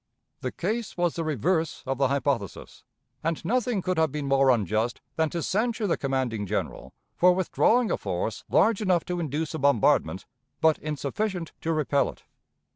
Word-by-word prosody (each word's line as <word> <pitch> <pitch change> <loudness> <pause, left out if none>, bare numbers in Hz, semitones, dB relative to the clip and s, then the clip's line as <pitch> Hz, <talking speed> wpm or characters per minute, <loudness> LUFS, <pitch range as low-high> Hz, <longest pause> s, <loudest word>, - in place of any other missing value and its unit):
The 130 - -3
case 215 +3 -3
was 175 -2 +1
the 165 - -3
reverse 160 - 0
of 135 0 -2
the 135 - +4
hypothesis, 135 -6 -2 0.4
and 165 0 -2
nothing 235 -2 0
could 185 -3 0
have 160 -3 +2
been 150 0 -3
more 135 0 +4
unjust 110 0 +1 0.2
than 160 -1 +1
to 170 0 -3
censure 220 +2 0
the 185 - +2
commanding 130 -6 -2
General - - -3 0.2
for 180 0 +5
withdrawing 220 +6 +2
a - - +1
force - - -3
large 225 -2 +3
enough 185 -5 +2
to 180 0 -3
induce 155 0 -2
a 160 - -3
bombardment, 130 -8 +2 0.3
but 160 -1 +3
insufficient 160 - -3
to 165 - -1
repel 145 -3 +1
it. - - -12
160 Hz, 170 wpm, -26 LUFS, 135-185 Hz, 0.4 s, for